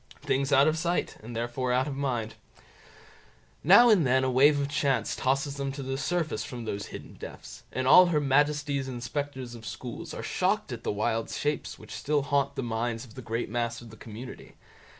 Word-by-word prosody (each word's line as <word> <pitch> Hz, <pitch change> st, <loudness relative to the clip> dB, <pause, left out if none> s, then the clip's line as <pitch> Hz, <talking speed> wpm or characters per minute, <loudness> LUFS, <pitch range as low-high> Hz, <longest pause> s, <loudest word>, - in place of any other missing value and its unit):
Things 135 Hz, +1 st, 0 dB
out 140 Hz, +1 st, +6 dB
of 155 Hz, +1 st, +1 dB
sight, 175 Hz, +2 st, -1 dB
and 115 Hz, +2 st, -8 dB
therefore 120 Hz, +2 st, -2 dB
out 130 Hz, +2 st, +2 dB
of 140 Hz, -, -4 dB
mind. 120 Hz, -6 st, -2 dB, 1.3 s
Now 225 Hz, +9 st, +8 dB
and 195 Hz, -6 st, +5 dB
then 130 Hz, 0 st, +3 dB
a 130 Hz, -, +1 dB
wave 145 Hz, +3 st, +5 dB
of 140 Hz, -, 0 dB
chance 140 Hz, -2 st, 0 dB
tosses 140 Hz, +2 st, 0 dB
them 140 Hz, -1 st, -2 dB
to 140 Hz, 0 st, -6 dB
the 135 Hz, 0 st, -3 dB
surface 155 Hz, -6 st, -1 dB
from 120 Hz, 0 st, -7 dB
those 100 Hz, -2 st, -4 dB
hidden -, -, -9 dB
depths, -, -, -10 dB
and 130 Hz, 0 st, -2 dB
all 180 Hz, +6 st, +9 dB
Her 160 Hz, -3 st, +2 dB
Majesty's 145 Hz, 0 st, +1 dB
inspectors 130 Hz, +1 st, -4 dB
of 115 Hz, -2 st, -10 dB
schools 120 Hz, +1 st, -7 dB
are -, -, -6 dB
shocked -, -, 0 dB
at -, -, -6 dB
the -, -, 0 dB
wild 110 Hz, +2 st, -1 dB
shapes 150 Hz, 0 st, -2 dB
which -, -, -11 dB
still 145 Hz, 0 st, 0 dB
haunt 140 Hz, -1 st, 0 dB
the -, -, -2 dB
minds 115 Hz, +1 st, -2 dB
of 115 Hz, -, -16 dB
the 130 Hz, -, -8 dB
great 115 Hz, 0 st, -3 dB
mass 115 Hz, +1 st, -2 dB
of 115 Hz, -2 st, -12 dB
the -, -, -11 dB
community. 115 Hz, +4 st, -10 dB
130 Hz, 200 wpm, -28 LUFS, 120-145 Hz, 1.3 s, all